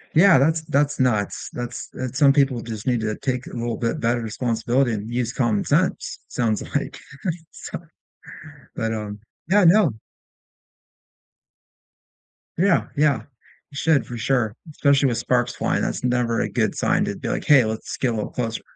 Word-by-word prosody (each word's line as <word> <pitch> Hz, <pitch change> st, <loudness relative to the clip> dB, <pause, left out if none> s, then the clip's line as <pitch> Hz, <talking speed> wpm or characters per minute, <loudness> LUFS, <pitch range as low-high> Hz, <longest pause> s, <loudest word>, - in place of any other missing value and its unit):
Yeah, 180 Hz, +1 st, +7 dB
that's 160 Hz, +4 st, +2 dB
that's 145 Hz, -2 st, 0 dB
nuts. 110 Hz, -6 st, 0 dB
That's 120 Hz, -1 st, -6 dB
that's 130 Hz, 0 st, -5 dB
Some 140 Hz, -2 st, +6 dB
people 135 Hz, -4 st, +2 dB
just 110 Hz, -2 st, -7 dB
need 120 Hz, -3 st, +2 dB
to 110 Hz, -1 st, -1 dB
take 130 Hz, -2 st, -2 dB
a -, -, -9 dB
little 120 Hz, -2 st, -3 dB
bit 115 Hz, -1 st, -1 dB
better 120 Hz, +1 st, +1 dB
responsibility 120 Hz, +2 st, 0 dB
and 105 Hz, +1 st, -4 dB
use 120 Hz, -1 st, -1 dB
common 115 Hz, -6 st, 0 dB
sense, -, -, 0 dB
sounds 110 Hz, -3 st, -1 dB
like, -, -, -2 dB, 0.5 s
so -, -, -7 dB, 1.0 s
but, 115 Hz, 0 st, -2 dB
um 105 Hz, -1 st, -5 dB, 0.3 s
Yeah, 200 Hz, +1 st, +5 dB
no 175 Hz, -, +5 dB, 2.7 s
Yeah, 180 Hz, 0 st, +3 dB
yeah. 145 Hz, -6 st, +2 dB, 0.5 s
It 140 Hz, -, -9 dB
should 150 Hz, -4 st, +2 dB
for 120 Hz, -, -6 dB
sure, 115 Hz, -2 st, 0 dB, 0.2 s
especially 140 Hz, -2 st, +3 dB
with 120 Hz, -, -1 dB
sparks 125 Hz, -1 st, 0 dB
flying. -, -, 0 dB
That's -, -, -2 dB
never 125 Hz, -2 st, +1 dB
a -, -, -1 dB
good -, -, 0 dB
sign -, -, +1 dB
to -, -, -3 dB
be, -, -, -6 dB
like, -, -, -2 dB
"Hey, 135 Hz, -5 st, +6 dB
let's 110 Hz, 0 st, -4 dB
get 125 Hz, -3 st, 0 dB
a -, -, -3 dB
little 105 Hz, -, -3 dB
closer." 115 Hz, -2 st, -3 dB
125 Hz, 165 wpm, -23 LUFS, 115-140 Hz, 2.7 s, Yeah